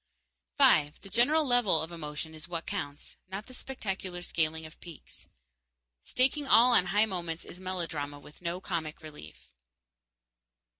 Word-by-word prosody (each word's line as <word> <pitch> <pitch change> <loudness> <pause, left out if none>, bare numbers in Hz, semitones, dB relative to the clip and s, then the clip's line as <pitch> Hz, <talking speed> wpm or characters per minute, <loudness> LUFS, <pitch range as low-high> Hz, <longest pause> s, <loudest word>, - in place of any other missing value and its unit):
_5. 155 - +5
The 195 - -12
general 300 +7 +4
level 245 - +3
of 160 +2 -4
emotion 160 -1 -6
is 155 +1 -8
what 170 -2 -4
counts, 145 0 -6
not 195 +3 -6
the 255 - -14
spectacular 195 -9 -5
scaling 160 -1 -1
of 155 - -13
peaks. 170 -4 -13 0.8
Staking 270 +3 +1
all 245 0 +7
on 180 - +6
high 205 +4 +4
moments 175 -5 -4
is 180 - -10
melodrama 165 -6 -3
with 150 +3 -16
no 175 +1 -3
comic 160 -4 -4
relief. 150 - -12
175 Hz, 145 wpm, -30 LUFS, 155-215 Hz, 0.8 s, all